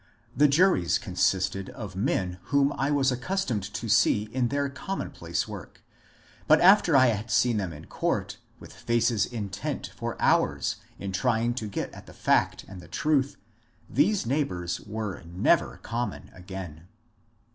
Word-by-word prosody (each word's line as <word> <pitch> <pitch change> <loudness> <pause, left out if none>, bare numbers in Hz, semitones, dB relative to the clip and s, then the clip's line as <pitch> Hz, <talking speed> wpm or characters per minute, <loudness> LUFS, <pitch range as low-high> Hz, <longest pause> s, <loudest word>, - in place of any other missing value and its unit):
The 150 - +5
juries 145 - +3
consisted 95 0 0
of 105 -7 -8
men 95 -4 -1
whom 140 0 +2
I 135 - 0
was 140 -2 +2
accustomed 125 - -2
to 115 +5 -4
see 105 -1 +4
in 125 -2 +1
their 140 +2 0
commonplace 165 +8 -4
work, - - -10 0.6
but - - +6
after 180 -5 +6
I 130 -2 +6
had 110 0 -2
seen 120 +1 +3
them 95 -4 -2
in 75 0 -10
court - - -2 0.2
with - - -12
faces 115 -3 +1
intent 105 -5 -4
for - - -5
hours - - +2 0.2
in 100 -1 -5
trying 120 +4 +1
to 115 -3 -4
get 100 - -4
at - - -12
the - - -12
fact - - +1
and 95 -2 -10
the - - -14
truth, 140 -3 0 0.5
these 185 - +2
neighbours 95 - -1
were 105 -2 -5
never 85 +2 +1
common 115 -3 -4
again. 90 -3 -9
115 Hz, 150 wpm, -27 LUFS, 95-140 Hz, 0.6 s, but